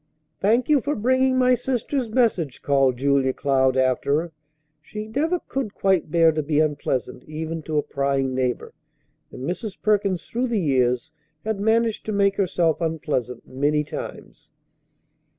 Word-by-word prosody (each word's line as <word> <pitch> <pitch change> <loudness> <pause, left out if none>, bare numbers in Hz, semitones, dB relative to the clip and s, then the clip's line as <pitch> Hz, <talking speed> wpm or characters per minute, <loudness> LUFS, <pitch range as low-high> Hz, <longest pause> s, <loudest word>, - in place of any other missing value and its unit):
"Thank 230 +5 +2
you 295 -3 +4
for 290 +3 -1
bringing 260 +3 +2
my 255 0 +4
sister's 250 0 -1
message," 215 - 0
called 135 -3 +2
Julia 135 0 +2
Cloud 130 -2 +1
after 130 +3 +2
her. 170 0 -6 0.5
She 210 +7 -7
never 315 +10 0
could 265 -7 -4
quite 190 -5 +1
bear 165 0 +4
to 155 0 -1
be 150 0 0
unpleasant 145 -4 -1
even 160 +1 -4
to 155 0 -3
a 150 - +2
prying 140 -1 -1
neighbor, 130 -1 -2 0.6
and 130 - -9
Mrs. 190 +3 -4
Perkins 200 -4 +1
through 245 +2 -2
the 230 -3 0
years 130 -2 +1 0.3
had 220 -2 -2
managed 225 +1 +1
to - - -1
make 200 -1 +2
herself 175 -4 +1
unpleasant 150 -6 -2
many 145 +3 0
times. 150 - -8
165 Hz, 150 wpm, -23 LUFS, 140-220 Hz, 0.6 s, you